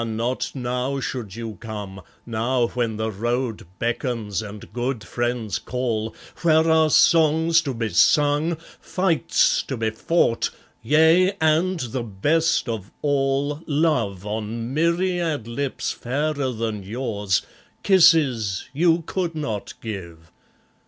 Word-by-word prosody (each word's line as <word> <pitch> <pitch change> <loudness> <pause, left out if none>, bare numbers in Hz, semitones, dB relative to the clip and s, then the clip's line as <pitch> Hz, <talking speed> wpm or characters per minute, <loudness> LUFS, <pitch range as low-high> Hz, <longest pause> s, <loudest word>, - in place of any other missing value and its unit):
not 115 +3 -2
now 125 +2 -2
should 115 -7 -5
you 115 -2 -6
come, 105 -4 -7 0.2
now 120 +2 0
when 115 -3 -2
the 110 0 -2
road 120 0 -2
beckons, 115 -3 -2
and 105 -1 -10
good 120 -1 -2
friends 120 -1 -2
call, 115 -3 -3 0.3
Where 160 -1 +4
are 160 -1 +4
songs 160 +1 +4
to 140 -5 -3
be 115 -1 -2
sung, 145 - +3 0.2
fights 180 -4 +2
to 135 - -5
be 110 -1 0
fought, 115 +1 +1 0.3
yea! 160 - +4
and 160 +3 +2
the 125 +1 -3
best 150 +12 +1
of 110 -4 -4
all, 140 +1 0
Love, 140 - 0
on 110 +3 -4
myriad 170 -4 0
lips 130 +3 -3
fairer 140 +2 -2
than 110 -3 -3
yours, 105 -3 -1 0.4
kisses 140 - +4
you 165 +3 +3
could 175 -3 -2
not 115 -10 -4
give! 85 -6 -8
125 Hz, 120 wpm, -23 LUFS, 110-155 Hz, 0.4 s, Where